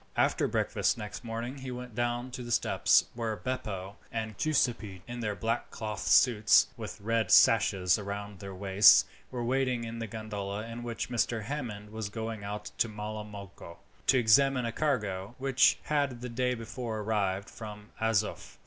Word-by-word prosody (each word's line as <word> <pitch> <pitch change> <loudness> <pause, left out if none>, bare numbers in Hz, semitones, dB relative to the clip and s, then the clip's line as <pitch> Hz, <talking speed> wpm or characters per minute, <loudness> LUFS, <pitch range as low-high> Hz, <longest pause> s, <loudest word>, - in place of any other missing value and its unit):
After - - +2
breakfast - - 0
next 105 +2 -7
morning 120 +4 -5
he 130 0 -6
went 125 -1 -7
down 120 +2 -2
to 125 - -6
the 120 -1 -6
steps, - - +3
where 115 -2 -2
Beppo 100 -6 -4
and 110 -2 -3
Giuseppi, 115 - 0
in 120 0 -6
their 105 -3 -2
black 115 +2 -2
cloth 105 -3 -5
suits 110 -4 +6
with - - -7
red 110 -1 0
sashes 95 -4 +5
round 100 -1 -6
their 100 0 -7
waists, 95 +2 +6 0.2
were 125 -2 -4
waiting 130 -1 0
with 115 0 -6
the 115 - -4
gondola 105 -1 -5
in 115 +1 -7
which 120 +1 -4
Mr. 115 -1 0
Hammond 105 -6 -5
was 110 -2 -4
going 110 0 -5
out 105 +1 -5
to 115 - +3
Malamocco, 105 -4 -8 0.3
to 135 - +5
examine 125 +2 +4
a 115 - -1
cargo 105 -7 -1
which 135 -1 +4
had 140 -5 0
the 125 - -5
day 125 +1 0
before 115 -1 -5
arrived 100 -2 -1
from 105 -1 -10
Azoph. 110 -2 -1
110 Hz, 165 wpm, -30 LUFS, 105-120 Hz, 0.3 s, suits